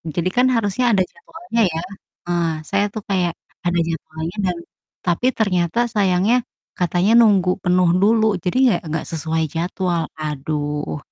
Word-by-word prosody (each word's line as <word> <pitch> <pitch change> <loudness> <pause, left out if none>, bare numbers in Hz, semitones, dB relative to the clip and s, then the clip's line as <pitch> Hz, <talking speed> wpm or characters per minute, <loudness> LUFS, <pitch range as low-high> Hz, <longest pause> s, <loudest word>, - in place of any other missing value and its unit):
Jadi 180 +1 0
kan 250 - +5
harusnya 230 +3 0
ada 195 -3 +3
jadwalnya 320 - -4
ya. 165 - -2 0.5
Eee, 170 -1 +1 0.2
saya 200 +1 +2
tuh 215 - -5
kayak 180 -3 +1 0.3
ada 175 0 +1
jadwalnya 160 +2 -5
dan 175 -1 -1 0.5
tapi 175 +7 0
ternyata 185 -1 +1 0.2
sayangnya 195 +3 +3 0.4
katanya 180 +4 +1
nunggu 200 -5 +4
penuh 180 -1 +3
dulu, 220 +1 +4 0.2
jadi 180 +7 -1
nggak 205 -8 +3
nggak 160 0 -2
sesuai 160 0 -1
jadwal. 175 0 -1 0.2
Aduh. 150 0 -3
180 Hz, 140 wpm, -20 LUFS, 165-205 Hz, 0.5 s, kan